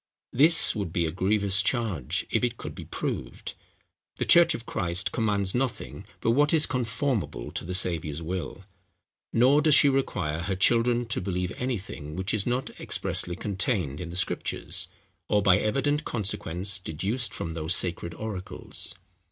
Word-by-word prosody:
This 155 +6 +6
would 100 -6 -3
be 85 0 0
a 80 - -2
grievous 100 +2 +1
charge, 105 - -1
if - - +1
it 120 -1 0
could - - -7
be - - -9
proved. - - -5 0.6
The - - -2
church 170 -1 +6
of 120 - -7
Christ 85 0 0
commands 100 -4 0
nothing 130 -1 -3 0.2
but 115 - +2
what 145 +6 +4
is 155 - +5
comformable 115 - -2
to - - -4
the 90 +2 -2
Saviour's 80 -5 0
will; 90 +3 -5 0.7
nor 130 +6 +4
does 150 -1 +5
she 145 - +7
require 90 - -1
her 95 +2 -2
children 120 +4 +3
to 115 -4 -2
believe 90 -1 -2
anything, 100 - -4
which 95 +1 -1
is 105 -1 0
not 125 +2 -1
expressly 85 - 0
contained 95 - -2
in 85 - -6
the 85 - -7
Scriptures, 90 - -1 0.4
or 105 -1 +3
by 90 -3 +5
evident 145 +7 0
consequence 100 - -2
deduced 95 +9 -2
from 85 - -5
those 80 +1 +1
sacred 85 -1 0
oracles. 105 -3 -5
100 Hz, 160 wpm, -27 LUFS, 90-120 Hz, 0.7 s, she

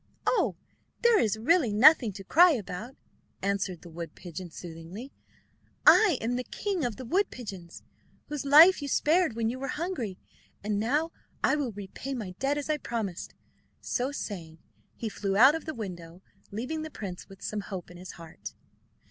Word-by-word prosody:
"Oh, - - +2 0.5
there 470 -3 +6
is 215 -1 +1
really 260 +1 +3
nothing 240 +2 +6
to 195 0 -9
cry 340 - +6
about," 220 +2 -5 0.5
answered 195 -3 -1
the 175 - -11
wood 165 -1 -7
pigeon 175 0 -8
soothingly. 175 - -9 0.7
"I 405 -10 +7
am 245 +2 -1
the 250 - -2
king 385 - -3
of 240 -4 -1
the 255 - -8
wood 380 - +1
pigeons, 190 -8 -9 0.4
whose 295 -2 -4
life 310 +6 +8
you 285 - -4
spared 315 -1 +2
when 230 -1 0
you 255 - -6
were 275 - -4
hungry. 295 - -3 0.5
And 205 0 -1
now 295 +9 0 0.3
I - - +4
will 285 -5 -2
repay 205 +7 -6
my 210 -7 -5
debt, 280 +2 +1
as 290 - -3
I 305 -1 +1
promised." 225 - -4 0.4
So 255 +2 -2
saying 170 - -6 0.4
he 230 - -4
flew 200 -2 -2
out 265 +6 +8
of 325 - -4
the 315 -2 -5
window, 180 -4 -8 0.3
leaving 255 +10 -4
the 315 - -5
prince 195 -10 -7
with 195 -1 -13
some 210 -1 -3
hope 190 -4 -7
in 175 - -12
his 180 +1 -9
heart. 165 -1 -10
230 Hz, 175 wpm, -28 LUFS, 190-290 Hz, 0.7 s, life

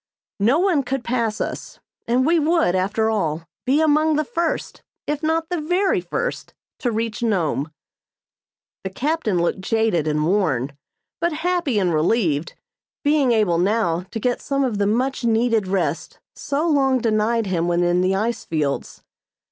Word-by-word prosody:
No 230 +9 +3
one 355 -4 +2
could 265 -1 -3
pass 235 -3 -1
us, - - -5 0.3
and 250 +2 +2
we 335 +2 +3
would, 320 - +2
after 205 +4 +1
all, 165 -6 -1 0.2
be 280 +4 +3
among 310 0 +3
the 305 - +1
first, 335 +3 -3 0.2
if 295 0 -2
not 320 +1 0
the 350 -3 -2
very 355 - +1
first, 470 - -4 0.2
to 245 - -1
reach 225 +1 -3
Nome. 165 -9 0 1.1
The 190 - -3
captain 260 - -1
looked 170 +2 0
jaded 220 -6 +1
and 150 0 +1
worn, 145 -8 0 0.4
but 340 +1 0
happy 345 -10 +1
and 180 -4 +1
relieved, 160 -2 +1 0.5
being 285 -3 +3
able 205 -7 +2
now 185 -3 0
to 225 - -5
get 245 +2 -1
some 275 -1 -1
of 230 -6 -1
the 200 - +2
much 255 +5 0
needed 225 -2 +2
rest 195 +1 -2 0.2
so 300 +3 -2
long 270 -4 +3
denied 225 0 +1
him 175 -3 -1
when 175 0 +1
in 175 +1 +2
the 185 +1 +1
ice 225 +4 -1
fields. 150 -4 -3
225 Hz, 160 wpm, -22 LUFS, 185-285 Hz, 1.1 s, No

